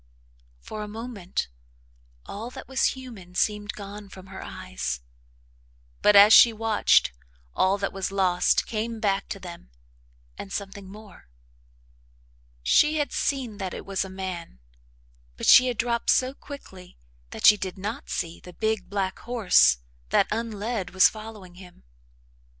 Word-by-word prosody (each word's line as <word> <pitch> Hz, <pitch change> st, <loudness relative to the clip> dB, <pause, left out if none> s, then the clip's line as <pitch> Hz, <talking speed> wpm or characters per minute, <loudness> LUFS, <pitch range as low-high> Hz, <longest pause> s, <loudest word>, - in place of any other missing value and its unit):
For 215 Hz, -, -7 dB
a 210 Hz, -, -5 dB
moment, 215 Hz, -4 st, -5 dB, 0.8 s
all 220 Hz, +4 st, -7 dB
that -, -, -10 dB
was 265 Hz, 0 st, +1 dB
human 210 Hz, -9 st, -11 dB
seemed 210 Hz, +1 st, 0 dB
gone 205 Hz, 0 st, -9 dB
from 190 Hz, -1 st, -12 dB
her 190 Hz, -, -7 dB
eyes, 60 Hz, +1 st, -5 dB, 1.0 s
but, 210 Hz, -, +5 dB
as 205 Hz, +2 st, +9 dB
she 235 Hz, -, +9 dB
watched, 220 Hz, -, +2 dB, 0.4 s
all 190 Hz, +2 st, +2 dB
that 200 Hz, -1 st, -3 dB
was 195 Hz, 0 st, -3 dB
lost 185 Hz, -2 st, +2 dB
came 225 Hz, +1 st, -3 dB
back 200 Hz, -2 st, 0 dB
to 195 Hz, -, -5 dB
them, 175 Hz, -, -10 dB, 0.7 s
and 195 Hz, -, -8 dB
something 200 Hz, -1 st, -6 dB
more. 205 Hz, -, -14 dB, 1.3 s
She 300 Hz, -, +4 dB
had 295 Hz, -1 st, -1 dB
seen 250 Hz, -7 st, -2 dB
that 190 Hz, -2 st, -4 dB
it -, -, -8 dB
was 195 Hz, -1 st, -1 dB
a 190 Hz, -, -8 dB
man, 185 Hz, -, -6 dB, 0.8 s
but -, -, -4 dB
she 255 Hz, -, +8 dB
had 245 Hz, -3 st, -2 dB
dropped 235 Hz, 0 st, -1 dB
so 260 Hz, +1 st, +3 dB
quickly 190 Hz, -12 st, -12 dB, 0.3 s
that -, -, -4 dB
she 210 Hz, -, +9 dB
did 190 Hz, -2 st, -6 dB
not 210 Hz, +8 st, -5 dB
see 170 Hz, 0 st, -3 dB
the 180 Hz, -, -13 dB
big, 220 Hz, -2 st, -2 dB
black 195 Hz, -2 st, -2 dB
horse 190 Hz, -, +4 dB, 0.3 s
that, -, -, +3 dB
unled, 220 Hz, -2 st, -3 dB
was 190 Hz, -, +6 dB
following 215 Hz, -4 st, -10 dB
him. 180 Hz, -1 st, -16 dB
200 Hz, 145 wpm, -25 LUFS, 185-225 Hz, 1.3 s, as